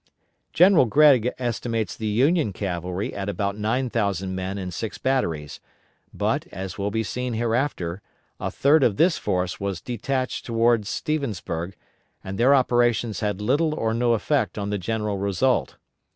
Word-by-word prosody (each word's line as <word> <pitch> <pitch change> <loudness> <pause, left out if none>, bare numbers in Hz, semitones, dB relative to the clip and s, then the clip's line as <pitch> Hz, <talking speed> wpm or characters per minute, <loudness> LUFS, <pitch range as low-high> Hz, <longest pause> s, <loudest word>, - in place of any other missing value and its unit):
General 180 -4 +6
Gregg 130 -1 +5
estimates 115 -4 -2
the 110 - -4
Union 130 - +2
cavalry 90 0 -3
at 100 0 -4
about 100 -1 -2
nine 115 +5 0
thousand 100 -5 -1
men 95 +1 -3
and 90 -2 -5
six 110 +3 -4
batteries, 80 - -1 0.5
but - - -1
as 95 0 -6
will 100 0 -2
be 110 +2 -1
seen 125 +3 -3
hereafter 115 -6 -1 0.4
a - - -2
third 145 +3 +3
of 110 -6 +2
this 170 0 +3
force 90 0 -1
was 100 -3 -3
detached 130 +4 -3
toward 115 -2 +2
Stevensburg, 100 - -3 0.5
and 95 +2 -6
their 130 +4 +6
operations 120 -4 +2
had 105 -2 -2
little 150 +8 +1
or 110 -6 -1
no 120 +1 +2
effect 130 +2 0
on 100 0 -3
the 105 - -1
general 105 0 -2
result. 100 +7 0
110 Hz, 150 wpm, -24 LUFS, 100-125 Hz, 0.5 s, General